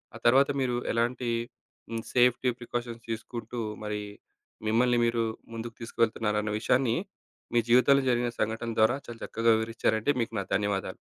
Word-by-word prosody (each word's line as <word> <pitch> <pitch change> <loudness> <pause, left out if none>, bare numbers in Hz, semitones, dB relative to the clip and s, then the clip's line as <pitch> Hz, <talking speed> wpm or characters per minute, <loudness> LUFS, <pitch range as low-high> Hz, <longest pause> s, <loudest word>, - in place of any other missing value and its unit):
ఆ - - -6
తర్వాత 135 +4 +6
మీరు 125 -2 0 0.2
ఎలాంటి 120 +1 0 0.8
సేఫ్టీ 125 0 +4
ప్రికాషన్స్ 120 -1 -5
తీసుకుంటూ 120 +1 -5 0.2
మరి 105 0 -3 0.7
మిమ్మల్ని 120 +2 +3
మీరు 115 0 +1 0.3
ముందుకు 115 0 -6
తీసుకెళ్తున్నారన్న 110 -2 0
విషయాన్ని 125 0 +2 0.6
మీ 120 - +5
జీవితంలో 140 +3 +6
జరిగిన 120 0 +2
సంఘటనల 110 +1 -1
ద్వారా 110 +4 +5
చాలా 115 -1 -8
చక్కగా 115 +1 +2
వివరించారండి. 110 +3 0
మీకు 115 0 -3
నా - - -1
ధన్యవాదాలు. 100 -1 -1
115 Hz, 130 wpm, -28 LUFS, 110-120 Hz, 0.8 s, తర్వాత